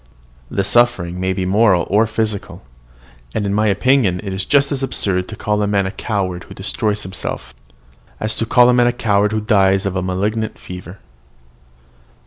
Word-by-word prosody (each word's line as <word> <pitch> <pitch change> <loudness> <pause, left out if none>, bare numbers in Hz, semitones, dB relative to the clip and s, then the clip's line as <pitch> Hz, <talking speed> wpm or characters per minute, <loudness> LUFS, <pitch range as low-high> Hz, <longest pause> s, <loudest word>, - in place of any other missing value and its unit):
The 100 - -1
suffering 100 -5 +2
may 95 0 0
be 95 0 -2
moral 95 -2 +3
or 110 +3 +3
physical; 110 - -3 0.7
and 105 - -1
in 100 - -1
my 105 +1 +2
opinion 105 -2 +2
it 100 -2 -4
is 95 0 -3
just 140 -1 +2
as 140 -2 -2
absurd 95 -8 -1
to 110 - -7
call 105 0 -1
a 105 - +1
man 100 -1 +1
a 95 - -3
coward 95 -5 -3
who - - -12
destroys 105 -1 -2
himself, 95 0 -6 0.7
as 110 0 -1
to 115 - -1
call 120 +1 +5
a 125 - +4
man 120 0 +4
a 120 - +1
coward 105 -3 +1
who 110 0 -1
dies 95 -3 +2
of 100 -1 -2
a 95 - 0
malignant 105 +4 -2
fever." 90 +1 -10
105 Hz, 185 wpm, -18 LUFS, 95-110 Hz, 0.7 s, call